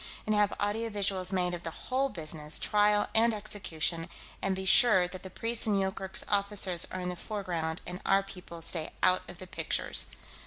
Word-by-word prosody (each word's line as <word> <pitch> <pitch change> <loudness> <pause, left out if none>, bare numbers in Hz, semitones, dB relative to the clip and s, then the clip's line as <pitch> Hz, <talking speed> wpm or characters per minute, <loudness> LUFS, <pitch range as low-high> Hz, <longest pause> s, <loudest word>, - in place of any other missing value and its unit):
And 215 - 0
have 210 -1 +2
audio 215 +3 -1
visuals 195 -3 0
made 180 -2 0
of 175 - -5
the 165 - -5
whole 265 +10 -2
business, 155 - 0
trial 210 0 +2
and 225 0 +3
execution, 170 -5 -2 0.3
and 195 -1 0
be 190 0 -5
sure 190 -3 +5
that 185 0 -10
the 190 - -9
priests 230 +5 +2
and 205 -2 +2
Yoorkerk's 190 0 -1
officers 200 -3 +3
are 185 - -5
in 180 - -3
the 180 - -4
foreground 175 -5 -4
and 180 +1 -7
our 195 0 +3
people 180 -3 -10
stay 160 -1 -1
out 185 0 +4
of 175 - -10
the 185 - -9
pictures." 185 - -1
190 Hz, 190 wpm, -29 LUFS, 180-210 Hz, 0.3 s, sure